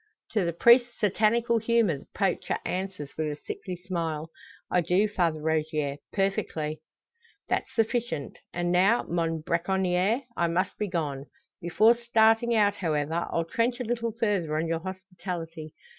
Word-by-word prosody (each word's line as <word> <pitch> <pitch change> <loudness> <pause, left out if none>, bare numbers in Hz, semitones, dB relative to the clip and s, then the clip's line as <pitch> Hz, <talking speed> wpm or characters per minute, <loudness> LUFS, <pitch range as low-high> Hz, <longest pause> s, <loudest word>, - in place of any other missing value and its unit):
To 210 - +1
the 170 - 0
priest's 240 +7 +5
satanical 225 +3 +2
humour 225 -9 +2
the - - -17
poacher 195 -3 0
answers, 185 -6 -4
with 155 - 0
a - - -4
sickly 220 - -6
smile, 165 -3 -4 0.4
"I 180 - +3
do, 180 +5 +2
Father 170 -6 0
Rogier; 155 -2 -1
perfectly." 160 -6 -1 0.7
"That's - - 0
sufficient. 225 - -1
And 175 0 -1
now, 195 +6 +4
mon 165 -2 -1
bracconier, 185 - +1
I 170 - +1
must 180 +3 -1
be 210 - 0
gone. 150 -6 -3 0.3
Before 210 +7 +5
starting 235 0 +3
out, 205 -2 +4
however, 160 -1 -1
I'll 165 - 0
trench 235 +8 0
a - - -1
little 230 0 -1
further 200 -9 0
on 160 +1 0
your 165 0 -1
hospitality. 180 -4 -7
180 Hz, 145 wpm, -27 LUFS, 165-220 Hz, 0.7 s, priest's